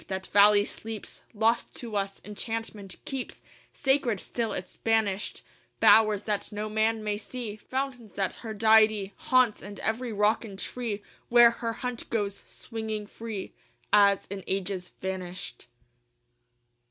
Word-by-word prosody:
That 190 0 -4
valley 205 0 +6
sleeps 220 -1 -7
Lost 225 +2 +1
to 230 -3 -6
us: 195 -1 -2
enchantment 210 -2 -4
keeps 265 -2 -5 0.3
Sacred 265 -6 +1
still 230 +2 -3
its 185 - -5
banished 220 -3 0 0.4
Bowers 215 -2 +6
that 210 -2 -2
no 210 +1 -3
man 220 +1 +1
may 210 -1 -1
see, 220 0 -6
Fountains 255 -1 -4
that 195 -2 0
her 220 -2 -5
deity 215 -2 +4
Haunts, 255 -4 +3
and 205 0 -9
every 235 +2 -1
rock 210 +2 +2
and 200 -4 -8
tree 215 -1 -4 0.3
Where 240 -1 +8
her 230 -1 -3
hunt 250 -1 -5
goes 205 -3 -1
swinging 220 -2 -5
free 215 -2 -7 0.4
As 200 -1 +5
in 195 -1 -5
ages 190 -1 -2
vanished. 185 -10 -5
215 Hz, 135 wpm, -28 LUFS, 200-230 Hz, 0.4 s, Where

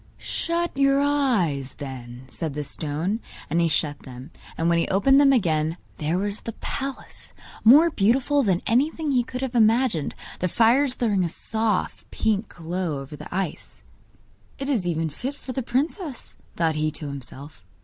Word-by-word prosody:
'Shut 340 +1 -1
your 275 0 +4
eyes, 230 - +1
then,' 130 -3 -8
said 150 +2 -3
the 150 - -2
stone; 160 +8 -2 0.3
and 170 +2 +3
he 170 - +3
shut 145 -1 +1
them, 130 +3 -11 0.3
and 165 - 0
when 170 0 +3
he - - +1
opened 270 +9 +4
them 275 -1 +6
again 165 - +1 0.2
there 160 +3 0
was 205 +2 -2
the 230 - -6
palace, 275 +4 -6 0.3
more 300 +9 +7
beautiful 260 +6 +2
than 190 -7 +1
anything 295 +6 +1
he 255 -2 +3
could 250 +1 -6
have 265 -2 -3
imagined, 225 - +3 0.2
the 180 - +1
fires 245 - +3
throwing 205 -6 +1
a 170 - 0
soft 220 +2 -2
pink 215 -1 0
glow 170 -3 -3
over 135 +2 -8
the - - -10
ice. 185 -2 -4 0.7
'It 275 - -4
is 230 -10 +1
fit - - 0
even 165 -1 0
for 265 - -6
the 265 - -1
princess,' 275 - -2 0.2
thought 165 -2 +1
he 155 0 0
to 155 0 -7
himself. 140 - -8
200 Hz, 170 wpm, -24 LUFS, 155-260 Hz, 0.7 s, more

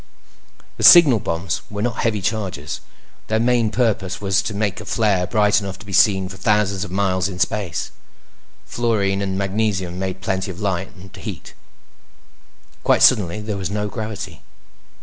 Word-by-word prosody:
The - - -4
signal 150 -10 +8
bombs 85 -3 -3
were 105 0 -4
not 120 0 -2
heavy 105 -4 0
charges; 95 -9 -3 0.5
their 110 0 +1
main 120 -1 +2
purposes 105 -5 -1
was 95 -2 +1
to 105 - -5
make 100 -2 -2
a - - -10
flare 100 -5 +1
bright 105 -2 +2
enough 95 -2 -6
to 95 - -14
be 100 - -8
seen 95 -1 +4
for 95 0 -10
thousands 100 -1 +1
of 105 - -7
miles 95 0 0
in 90 - -7
space. 95 -3 -2 0.7
Fluorine 100 -5 0
and 95 -1 -2
magnesium 95 -3 -1
made 95 -1 -3
plenty 95 0 -2
of 95 0 -7
light—and 95 -1 -4
heat. - - -8 1.3
Quite - - +3
suddenly, 100 +1 +4
there 105 -1 -4
was 95 -2 -3
no 105 +1 -2
gravity. 110 0 -6
100 Hz, 160 wpm, -20 LUFS, 95-105 Hz, 1.3 s, signal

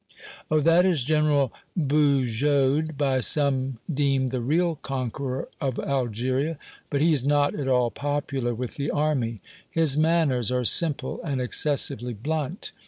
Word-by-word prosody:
"Oh! 155 - +3
that 165 +3 +4
is 175 -8 +2
General 150 -2 +1 0.2
Bugeaud, 140 0 +1
by 135 -2 +1
some 135 -2 +2
deemed 135 -4 0
the 125 -1 -3
real 165 +6 0
conqueror 130 0 -4
of 130 -3 -2
Algeria. 130 +4 -1 0.3
But 140 -1 -1
he's 155 -5 +2
not 145 +1 +2
at 140 -3 -4
all 125 -2 +2
popular 140 -4 -2
with 125 +1 -6
the 140 0 -2
army. 130 -8 -1 0.3
His 155 -3 +1
manners 155 -7 +2
are 125 -1 0
simple 150 -1 +1
and 140 -6 -3
excessively 125 -2 +1
blunt. 155 - -3
140 Hz, 135 wpm, -25 LUFS, 130-150 Hz, 0.3 s, that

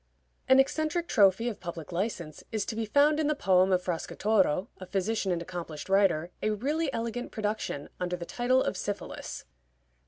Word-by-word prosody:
An 260 - +8
eccentric 310 +5 +1
trophy 200 +3 +4
of 230 - -3
public 170 -3 -7
license 175 -4 -3
is 215 -3 -1
to 220 - -4
be 225 -1 -2
found 290 +6 +4
in 310 - +1
the 305 - +1
poem 190 -7 +3
of 180 -1 +2
Fracastoro, 185 +1 +1
a 185 - -8
physician 200 +1 0
and 170 -1 -1
accomplished 170 -3 -7
writer 185 -4 +3
a 215 - +1
really 280 +8 0
elegant 235 +1 -3
production 210 - -3
under 180 0 -1
the 175 -1 -6
title 255 +6 +2
of - - -1
Syphilis. 205 0 -5
205 Hz, 175 wpm, -29 LUFS, 180-240 Hz, -, An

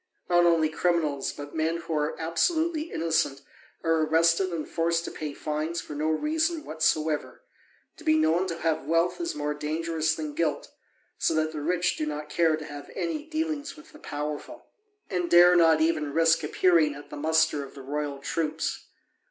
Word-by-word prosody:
Not 175 -1 +4
only 165 -2 +4
criminals, 155 -3 0
but 145 0 -9
men 160 +1 0
who 170 -1 -6
are 150 0 -1
absolutely 315 - 0
innocent 160 -4 0 0.4
are 165 -1 +2
arrested 165 +4 +3
and 165 -3 -4
forced 165 0 0
to - - -5
pay 150 -1 -5
fines 155 +2 -3
for 150 - -8
no 150 +2 -1
reason 315 - 0
whatsoever: 155 -1 -1 0.5
to - - -13
be 155 0 +3
known 160 +4 +2
to 170 -2 -4
have 160 -3 -1
wealth 165 - +1
is 340 - -2
more 150 0 -2
dangerous 160 +1 -1
than 155 -2 -5
guilt, 165 +1 -1 0.5
so 160 - +1
that 155 0 +1
the 155 -1 -5
rich 175 +3 0
do 155 - -2
not 150 0 -5
care 160 -1 +2
to 155 - -8
have 145 -1 -9
any 310 -3 -3
dealings 310 -2 -3
with 310 +1 -15
the 300 - -15
powerful, 150 - -6 0.4
and 180 -3 -2
dare 175 +1 +7
not 165 -2 +5
even 155 -3 +1
risk 165 0 +3
appearing 155 -1 +3
at 145 - -12
the - - -6
muster 160 0 +2
of 135 - -12
the 135 - -9
royal 145 +1 -3
troops. 155 +3 -3
160 Hz, 180 wpm, -27 LUFS, 150-170 Hz, 0.5 s, dare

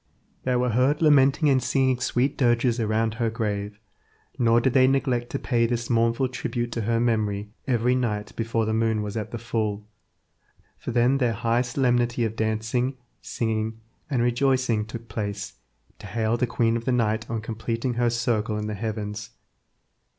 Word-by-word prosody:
They 130 -1 +1
were 125 0 +1
heard 130 +6 +2
lamenting 145 0 +5
and 135 -2 +4
singing 130 +1 +1
sweet 130 +2 0
dirges 120 -1 +2
around 110 0 +1
her 115 0 0
grave; 105 -2 -3 0.6
nor 115 -1 +4
did 125 +1 +1
they 130 -1 +6
neglect 130 -3 +1
to - - -2
pay 120 -4 +1
this 120 0 -2
mournful 115 +2 +2
tribute 120 -1 -3
to 115 - -2
her 115 +2 +1
memory 105 -3 0 0.2
every 125 -1 +2
night 105 -5 -2
before 115 0 -1
the 110 - -1
moon 110 -1 +1
was 105 0 -5
at 110 -2 -3
the 120 - -5
full, 110 -3 -2 0.9
for - - -6
then 125 +3 +3
their 120 -3 +2
high 115 +2 +1
solemnity 120 -2 +1
of 110 0 -3
dancing, 115 +4 -1 0.2
singing, 110 -1 -2 0.3
and 130 -5 +1
rejoicing 120 -3 +1
took 115 +1 -8
place 100 -2 -4 0.5
to - - -9
hail 110 +2 0
the 125 +1 0
queen 115 -1 +1
of 115 0 -3
the 130 - +1
night 110 -3 0
on 115 -1 -2
completing 115 +3 -3
her 120 0 +1
circle 115 -2 0
in 105 - -3
the 105 - -3
heavens. 105 0 -4
115 Hz, 170 wpm, -25 LUFS, 110-125 Hz, 0.9 s, they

